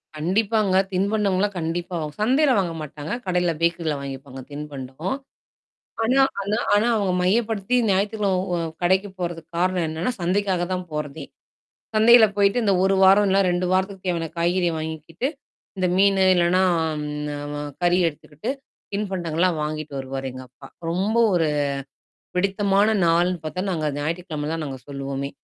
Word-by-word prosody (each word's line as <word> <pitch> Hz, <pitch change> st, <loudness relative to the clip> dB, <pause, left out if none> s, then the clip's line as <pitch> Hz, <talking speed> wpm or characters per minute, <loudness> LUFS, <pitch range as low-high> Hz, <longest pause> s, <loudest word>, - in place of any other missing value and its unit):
கண்டிப்பாங்க. 195 Hz, +4 st, +1 dB, 0.2 s
தின்பண்டம்லாம் 200 Hz, 0 st, +1 dB
கண்டிப்பா 170 Hz, +2 st, -3 dB
வாங் 150 Hz, -1 st, -5 dB
சந்தையில 265 Hz, +3 st, +3 dB
வாங்க 175 Hz, -3 st, -1 dB
மாட்டாங்க. 150 Hz, +1 st, -7 dB
கடையில 180 Hz, -2 st, +1 dB
பேக்கரில 170 Hz, -2 st, +1 dB
வாங்கிப்பாங்க. 135 Hz, -1 st, -7 dB
தின்பண்டம். 145 Hz, -, -5 dB, 0.9 s
ஆனா 260 Hz, +4 st, +4 dB, 0.2 s
ஆனா 205 Hz, +3 st, -1 dB, 0.2 s
ஆனா 210 Hz, +3 st, +3 dB
அவங்க 195 Hz, -3 st, +1 dB
மையப்படுத்தி 215 Hz, +3 st, +1 dB, 0.2 s
ஞாயித்துகிழமை 200 Hz, -1 st, +1 dB
உ -, -, +1 dB, 0.3 s
கடைக்கு 190 Hz, +3 st, +2 dB
போறதுக்கு 170 Hz, -2 st, -5 dB
காரணம் 180 Hz, -2 st, +1 dB
என்னன்னா? 160 Hz, +9 st, -2 dB
சந்தைக்காக 185 Hz, 0 st, +1 dB
தான் 180 Hz, -1 st, -3 dB
போறதே. 150 Hz, -1 st, -4 dB, 0.7 s
சந்தையில 225 Hz, +1 st, +7 dB
போயிட்டு 200 Hz, +4 st, +3 dB
இந்த 200 Hz, -2 st, +3 dB
1 195 Hz, 0 st, +3 dB
வாரம் 200 Hz, +2 st, +6 dB
இல்ல 195 Hz, +1 st, +3 dB
2 175 Hz, +1 st, 0 dB
வாரத்துக்கு 190 Hz, 0 st, -1 dB
தேவையான 170 Hz, -2 st, -1 dB
காய்கறிய 175 Hz, +1 st, +2 dB
வாங்கிக்கிட்டு. 160 Hz, -, -4 dB, 0.5 s
இந்த 185 Hz, -1 st, +1 dB
மீனு 195 Hz, 0 st, +4 dB
இல்லன்னா 175 Hz, +1 st, +3 dB, 0.2 s
அம் 150 Hz, -1 st, -3 dB, 0.5 s
அ -, -, -4 dB, 0.2 s
கறி 175 Hz, +1 st, +4 dB
எடுத்துக்கிட்டு 155 Hz, -, -7 dB, 0.4 s
தின்பண்டங்கள்லாம் 180 Hz, -4 st, 0 dB
வாங்கிட்டு 155 Hz, -1 st, -5 dB
வருவாரு 135 Hz, 0 st, -5 dB
எங்க 130 Hz, -, -8 dB
அப்பா. 135 Hz, +2 st, -15 dB, 0.2 s
ரொம்ப 195 Hz, +6 st, 0 dB, 0.2 s
ஒரு 165 Hz, -3 st, +2 dB, 0.9 s
பிடித்தமான 200 Hz, +3 st, +2 dB
நாள்ன்னு 175 Hz, +2 st, +2 dB
பார்த்தா 185 Hz, +4 st, -3 dB
நாங்க 155 Hz, -3 st, -1 dB
ஞாயிற்றுக்கிழமை 155 Hz, -1 st, -3 dB
தான் 165 Hz, -1 st, -3 dB
நாங்க 135 Hz, -2 st, -6 dB
சொல்லுவோமே. 140 Hz, 0 st, -4 dB
180 Hz, 135 wpm, -23 LUFS, 155-200 Hz, 0.9 s, சந்தையில